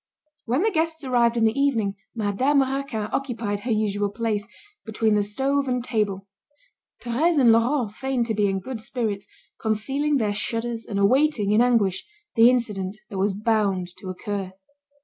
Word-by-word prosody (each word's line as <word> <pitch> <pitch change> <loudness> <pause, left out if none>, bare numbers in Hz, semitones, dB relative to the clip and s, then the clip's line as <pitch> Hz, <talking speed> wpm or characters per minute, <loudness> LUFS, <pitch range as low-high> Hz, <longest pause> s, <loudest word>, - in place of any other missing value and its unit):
When 255 - +1
the 445 - +2
guests 320 -2 -1
arrived 240 -2 +2
in 230 - +2
the 220 0 +3
evening, 230 -8 +1 0.2
Madame 235 +7 +2
Raquin 270 -4 -2
occupied 230 -6 -2
her 235 +4 -4
usual 205 -2 0
place, 210 -1 -2 0.4
between 220 0 0
the 210 - +3
stove 270 +7 0
and 250 -1 -1
table. 205 -5 -1 0.8
Thérèse 295 +8 +1
and 250 -5 +6
Laurent 230 0 +2
feigned 265 0 -1
to 225 - -1
be 210 -1 +2
in 195 0 -1
good 240 +2 -6
spirits, 220 -4 -3 0.3
concealing 270 +7 0
their 215 -5 0
shudders 230 +2 -3
and 200 - -3
awaiting, 225 +1 +3
in 215 +2 +4
anguish, 225 -7 +2 0.3
the 230 +1 +7
incident 210 -6 -1
that 195 - -4
was 195 0 +1
bound 205 -4 0
to 190 - -9
occur. 190 +1 -4
225 Hz, 165 wpm, -24 LUFS, 205-260 Hz, 0.8 s, the